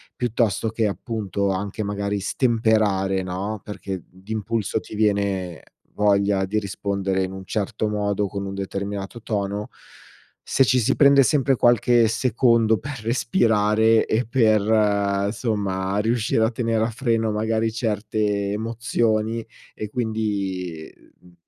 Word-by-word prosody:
piuttosto 115 -3 0
che 110 0 -1
appunto, 100 -2 -2
anche 100 +3 -3
magari 100 0 -2
stemperare, 105 -4 +1
no, 95 +4 -4
perché 95 -4 -6
d'impulso 110 +3 -3
ti - - -12
viene 100 -4 0 0.3
voglia 100 -1 +2
di 105 +3 0
rispondere 100 -1 -2
in 95 - -4
un 95 0 -8
certo 105 +2 -2
modo, 105 -1 -1
con 100 0 -5
un 95 - -5
determinato 100 +2 -5
tono 100 -1 -3 0.8
se 135 - +3
ci 125 +2 +3
si 125 +4 +1
prende 140 -1 +6
sempre 135 -1 +2
qualche 120 -1 +4
secondo 115 -1 +2
per 140 +1 -7
respirare 110 -1 +2
e 110 +1 0
per 105 -4 +2
somma 100 -4 -2
riuscire 115 0 +1
a 110 - +2
tenere 115 -1 0
a 115 - 0
freno 115 -2 0
magari 110 +1 0
certe 105 -2 -1
emozioni 115 0 -1 0.3
e 105 - -5
quindi, 100 -8 -3 0.3
uhm 90 0 -19
105 Hz, 125 wpm, -23 LUFS, 100-115 Hz, 0.8 s, prende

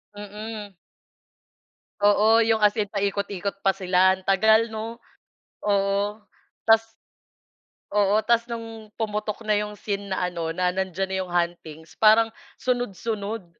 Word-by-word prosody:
Mm. 210 0 -7 1.3
Oo, 210 +2 +5
yung 220 -1 +2
as 210 - +6
in 205 - 0
paikot-ikot 200 -1 -2
pa 195 -1 +1
sila. 185 0 +3
Ang 190 - -16
tagal, 220 +4 +4
'no? 225 +2 -6 0.6
Oo, 200 +1 0 0.4
tas 225 0 +4 1.1
oo. 205 0 +3
Tas 235 +1 +2
nung 225 -2 -7
pumutok 215 0 -3
na 215 - +2
yung 210 0 -2
scene 200 -1 -4
na 190 -1 -1
ano 170 -2 -3
na 180 +2 0
nandiyan 190 0 -2
na - - 0
yung 185 - -6
huntings 170 -2 -3
parang 225 +1 +5 0.2
sunod-sunod. 225 -4 -3
205 Hz, 130 wpm, -24 LUFS, 190-220 Hz, 1.3 s, as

